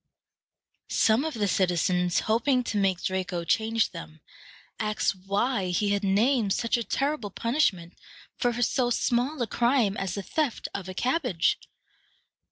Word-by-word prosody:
Some 225 +4 +3
of 315 -3 -3
the 210 -2 0
citizens, 180 -1 +1
hoping 250 +4 +1
to 220 - -3
make 190 -2 +1
Draco 185 -2 -2
change 225 +6 +1
them, 80 0 -10 0.6
asked 215 0 0
why 200 0 0
he 180 +4 0
had 200 0 0
named 210 +2 +2
such 230 +2 0
a 235 - -1
terrible 275 -3 -1
punishment 200 - 0 0.4
for 245 -1 0
so 245 +1 +1
small 245 +4 0
a - - 0
crime 235 -2 +1
as 190 -2 -3
the 200 - -4
theft 300 - -2
of 190 -2 -5
a 185 - -7
cabbage. 250 - +1
215 Hz, 145 wpm, -27 LUFS, 190-245 Hz, 0.6 s, Some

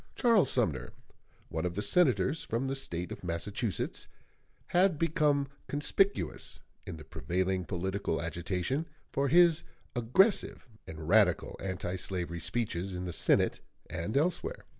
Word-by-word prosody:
Charles 225 - +4
Sumner, 80 - -1 0.6
one 80 - -3
of 90 -1 -2
the 105 - -1
Senators 130 - +3
from 115 +4 -2
the 135 - -1
State 90 -10 -4
of - - -8
Massachusetts, 95 +5 -2 0.6
had 180 -2 +3
become 150 -3 +2 0.2
conspicuous, 195 +7 0 0.3
in - - -5
the 80 - -10
prevailing 90 +5 -1
political 95 -1 -2
agitation, 90 - -2 0.2
for 140 +1 +1
his 170 +2 +5 0.3
aggressive 130 - +2 0.2
and 80 -1 -7
radical 95 -2 +3
anti 95 -1 -3
slavery 90 -2 -3
speeches 90 0 -2
in 90 +1 -4
the 90 - -4
Senate - - +3 0.3
and 100 +10 -2
elsewhere. 180 - -1
100 Hz, 130 wpm, -31 LUFS, 90-145 Hz, 0.6 s, his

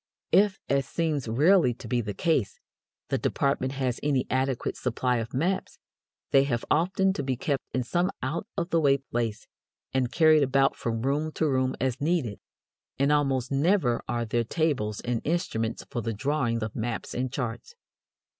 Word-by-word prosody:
If, 195 +2 +4
as 140 -1 +1
seems 155 -7 -1
rarely 145 - +4
to - - -10
be 120 -1 +1
the 105 -3 -5
case, 155 - 0 0.5
the - - 0
department 140 -1 0
has 130 -3 -1
any 140 -3 +1
adequate 130 -1 0
supply 125 0 0
of 115 +2 -4
maps, 180 +8 -1 0.5
they 135 0 +5
have 120 -4 -1
often 190 +4 +2
to 145 - -3
be 130 -2 -2
kept 140 +2 -1
in 130 - 0
some 175 +8 0
out 160 +10 -2
of 170 - -2
the 165 - +3
way 140 -2 +4
place, 120 -5 -3 0.5
and 130 -2 +1
carried 155 -2 +5
about 135 0 +3
from 115 -1 -3
room 145 +4 0
to 160 - +1
room 130 -2 +1
as 130 0 -1
needed; 150 - 0 0.6
and 140 +2 +2
almost 135 -3 +1
never 140 -3 +2
are 120 -1 -1
there 120 +1 0
tables 120 -6 -1
and 120 -2 -2
instruments 145 -10 -1
for 120 - -2
the 115 0 -2
drawing 120 -1 0
of 110 - -5
maps 115 -1 -3
and 125 0 -2
charts. 125 - -4
135 Hz, 175 wpm, -27 LUFS, 120-155 Hz, 0.6 s, they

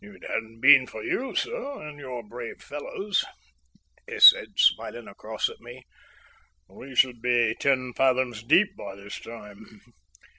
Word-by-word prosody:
"If 205 0 -14
it - - -19
hadn't 115 0 -5
been 135 -1 +7
for 110 - -9
you, 265 +1 -3
sir, 445 - -4
and 145 -1 -11
your 125 -4 -7
brave 120 +2 -9
fellows," 190 +7 -3 0.8
he - - -7
said, - - +8
smiling 120 -1 +1
across 110 +2 -4
at - - -11
me, 120 +2 -13 0.8
"we 130 0 -13
should 125 -2 +2
be 120 -2 +1
ten 130 -3 0
fathoms 130 -4 0
deep 190 - +3
by 95 - -9
this 100 +1 -9
time. 105 -2 -12
125 Hz, 150 wpm, -25 LUFS, 115-145 Hz, 0.8 s, said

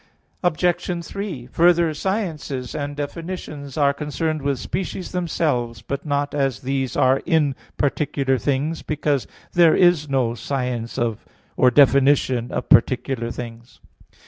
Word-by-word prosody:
Obj. 175 0 0
3: 195 -12 -5
Further, 170 -1 +4
sciences 155 - -3
and 145 -1 -4
definitions 145 -2 -6
are 140 -2 +3
concerned 155 +2 -2
with 140 -1 0
species 175 - -4
themselves, 135 - -1
but 140 +6 -5
not 145 0 0
as 135 -6 0
these 135 -1 -2
are 130 +1 +4
in 150 -4 +3 0.2
particular 140 -2 0
things, 145 +6 -1
because 145 -3 -1 0.3
there 170 -2 +6
is 175 -5 +4
no 130 -4 +1
science 125 -2 -3 0.6
or 125 - +5
definition 135 -2 +4
of - - -3
particular 120 0 +3
things. 115 0 -8
145 Hz, 120 wpm, -22 LUFS, 130-160 Hz, 0.6 s, there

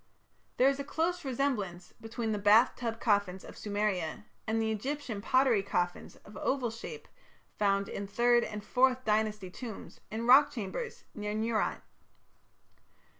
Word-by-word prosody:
There 255 - +5
is 275 0 +2
a - - -2
close 330 +5 -1
resemblance 235 -10 -2
between 225 0 -3
the 210 - -1
"bath 210 +4 +5
tub" 230 -2 -4
coffins 200 -5 +1
of - - -10
Sumeria 205 -5 -2 0.2
and 220 +1 +1
the 220 0 0
Egyptian 245 -1 -3
pottery 255 -2 +3
coffins 180 -3 -2
of 210 - -13
oval 255 -4 0
shape 340 - -8 0.5
found 200 -1 +2
in 200 - -5
Third 240 +3 +3
and 210 -1 -5
Fourth 255 +2 +2
Dynasty 210 -3 0
tombs 230 +1 -9
in 225 +2 -4
rock 270 +4 +7
chambers 245 - -5
near 210 0 -4
Nuerat. 220 0 -1
220 Hz, 145 wpm, -31 LUFS, 205-255 Hz, 0.5 s, rock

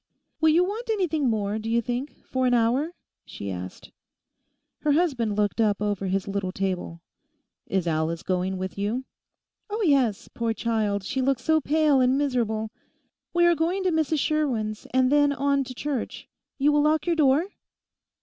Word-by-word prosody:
'Will 315 - +4
you 335 +3 +5
want 430 +6 -4
anything 330 - +1
more, 210 -1 -1
do 220 +1 -5
you 230 +1 +3
think, 245 +5 -5
for 260 -1 0
an 245 - +3
hour?' 255 +9 +1 0.3
she 100 -1 -7
asked. 90 0 -8 0.9
Her 300 -1 +2
husband 265 -10 +1
looked 210 +2 +1
up 210 -2 +2
over 205 -2 -1
his 195 +1 -1
little 200 -2 -2
table. 185 -3 -3 0.7
'Is 190 -3 0
Alice 165 0 -1
going 185 0 -1
with 190 +1 -5
you?' 220 +6 -1 0.7
'Oh 430 +2 -2
yes; 265 - +2
poor 230 -1 -2
child, 215 -4 -1
she 260 +7 -2
looks 260 -1 0
so 315 0 +3
pale 295 -2 +3
and 255 +1 +3
miserable. 230 -6 -1 0.6
We 345 0 +3
are 345 - +6
going 340 +4 0
to 370 - +2
Mrs 315 -1 +1
Sherwin's, 255 -9 -1
and 255 0 +3
then 290 -1 +4
on 280 0 +1
to 255 - -8
Church. 280 -2 -4 0.3
You 290 +2 +3
will 295 0 +3
lock 305 0 +2
your 345 -1 +1
door? 305 +4 +3
255 Hz, 170 wpm, -25 LUFS, 205-300 Hz, 0.9 s, are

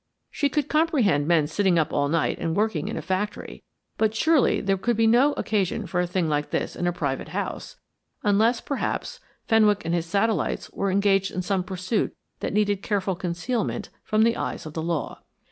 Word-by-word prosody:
She 285 - 0
could 290 0 -1
comprehend 265 - +2
men 165 -3 +4
sitting 180 +3 +1
up 155 -3 +1
all 145 0 +1
night 165 0 0
and 165 -1 -1
working 205 -7 0
in - - -4
a - - -4
factory, 190 +3 -3 0.4
but 220 0 +2
surely 315 +3 +3
there 195 -1 +1
could 230 +4 -1
be 225 - +3
no 250 +6 +5
occasion 205 -8 -1
for 175 - -2
a 180 - -1
thing 175 -1 0
like 150 -1 -1
this - - -2
in 175 - -1
a - - +2
private 145 -6 -3
house, - - -5 0.5
unless, 220 +4 +3
perhaps, 280 - -3 0.3
Fenwick 210 -4 +3
and 165 - -1
his 170 -1 -1
satellites 205 +5 0
were 200 - -1
engaged 195 0 +2
in 185 - -4
some 190 0 0
pursuit 190 +3 -2 0.2
that - - -3
needed 205 -1 +1
careful 195 -2 -1
concealment 195 +5 -3
from 215 0 +2
the 230 +1 +3
eyes - - -4
of 155 - -7
the 160 - -3
law. 165 -1 -3
195 Hz, 195 wpm, -25 LUFS, 175-220 Hz, 0.5 s, no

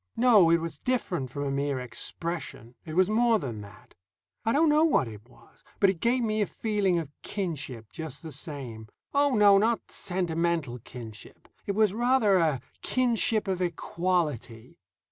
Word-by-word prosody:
No; 225 -8 +6
it 170 - +5
was 165 0 -6
different 185 - -1
from 145 +3 -4
a 140 - -2
mere 140 -1 -1
expression; 125 0 -4
it 155 - -6
was 185 0 +4
more 230 +2 +3
than 120 - -5
that. 105 +1 -14 0.5
I 225 - +1
don't 310 +6 +4
know 300 +1 +4
what 305 - +3
it 110 +2 -11
was, 120 -1 -21 0.2
but 195 -1 +5
it 180 - -9
gave 245 +4 +1
me 215 -1 0
a 205 - +1
feeling 205 -5 0
of 160 -4 -4
kinship 150 - -5
just 160 -2 -7
the 160 - -7
same. 130 -7 -6 0.3
Oh, 285 -2 +3
no, 205 -2 +6
not 225 +2 0
sentimental 170 -7 -1
kinship. 115 -2 -11 0.2
It 200 - 0
was, 210 -1 +3
rather, 235 -4 +3
a 155 -6 +1 0.2
kinship 230 -4 +1
of 185 -1 -1
equality. 170 - -2
170 Hz, 165 wpm, -27 LUFS, 135-215 Hz, 0.5 s, No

